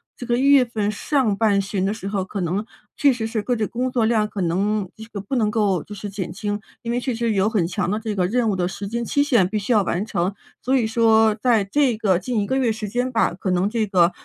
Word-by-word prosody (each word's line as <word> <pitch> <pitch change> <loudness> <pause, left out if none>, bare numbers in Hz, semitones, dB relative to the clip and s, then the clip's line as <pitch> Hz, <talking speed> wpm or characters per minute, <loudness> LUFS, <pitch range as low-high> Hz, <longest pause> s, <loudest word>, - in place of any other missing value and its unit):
这 245 - -8
个 240 -1 +1
一 - - 0
月 280 -2 +7
份 215 -3 -2
上 240 -1 0
半 210 -3 +3
旬 195 -1 -2
的 195 - +1
时 205 -3 -7
候， 200 -2 -1
可 195 0 -5
能， 180 +5 -1 0.3
确 285 -2 +4
实 235 -3 -3
是 225 -1 -2
个 245 +3 -1
这 220 - 0
工 250 +4 -2
作 240 -3 +1
量 220 -2 +2
可 205 -2 -5
能 195 +4 0
这 220 - -10
个 220 -3 -7
不 200 +7 -4
能 215 -3 +2
够 205 -6 +1
就 210 - -9
是 205 - -6
减 190 -3 -4
轻， 205 +2 -3 0.2
因 235 - -3
为 245 - 0
确 250 -1 -2
实 230 0 0
有 200 +1 +2
很 205 -6 +1
强 175 - -2
的 210 +3 -1
这 220 -1 -3
个 185 -3 +1
任 235 +3 +1
务 200 - +1
的 180 -1 0
时 200 +1 -6
间 235 +3 -3
期 285 +5 +1
限 235 -11 +3
必 215 - -2
须 210 +4 0
要 210 - +4
完 190 +2 -1
成。 190 -1 -1 0.3
所 265 +2 +2
以 235 - +1
说 225 -1 +4
在 225 -1 +2
这 245 +3 +1
个 190 -5 +2
近 235 +4 -2
1 - - -1
个 260 - -1
月 250 -4 +2
时 215 -1 -4
间 245 +4 -1
吧， 230 -6 +1
可 185 +1 -4
能 180 +2 +2
这 220 -1 -1
个， 180 -2 +3
215 Hz, 295 characters per minute, -22 LUFS, 195-235 Hz, 0.3 s, 月